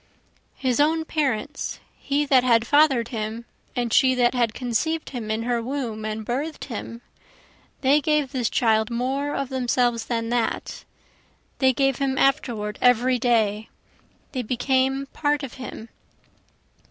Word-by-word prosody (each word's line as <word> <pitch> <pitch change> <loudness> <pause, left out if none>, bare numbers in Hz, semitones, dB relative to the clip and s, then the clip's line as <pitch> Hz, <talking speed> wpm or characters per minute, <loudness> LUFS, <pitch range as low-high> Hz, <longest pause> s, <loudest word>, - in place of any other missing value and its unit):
His 255 -1 -1
own 320 +2 +2
parents, 285 -3 -2 0.2
he 285 +1 0
that 265 -3 +4
had 230 -2 +3
father'd 275 -4 +3
him 225 0 -4 0.3
and 240 -2 -1
she 260 -2 +5
that 245 0 +3
had 235 -3 0
conceiv'd 260 +7 -2
him 235 -5 -5
in 220 +1 -1
her 240 0 0
womb 235 -4 -4
and 215 0 -4
birth'd 285 +7 -3
him, 235 -1 -7 0.8
They 285 +3 +4
gave 300 -2 +1
this 245 -3 -1
child 220 -2 +2
more 265 +5 -2
of 275 -2 -2
themselves 245 -3 0
than 230 -1 -2
that, 240 -1 -2 0.7
They 265 -1 +5
gave 270 -1 +1
him 270 -1 -1
afterward 235 -8 0
every 250 +1 +4
day, 220 -3 +1 0.6
they 255 - -2
became 260 +3 0
part 295 -1 0
of 265 - -6
him. 230 -2 -8
250 Hz, 140 wpm, -24 LUFS, 230-275 Hz, 0.8 s, she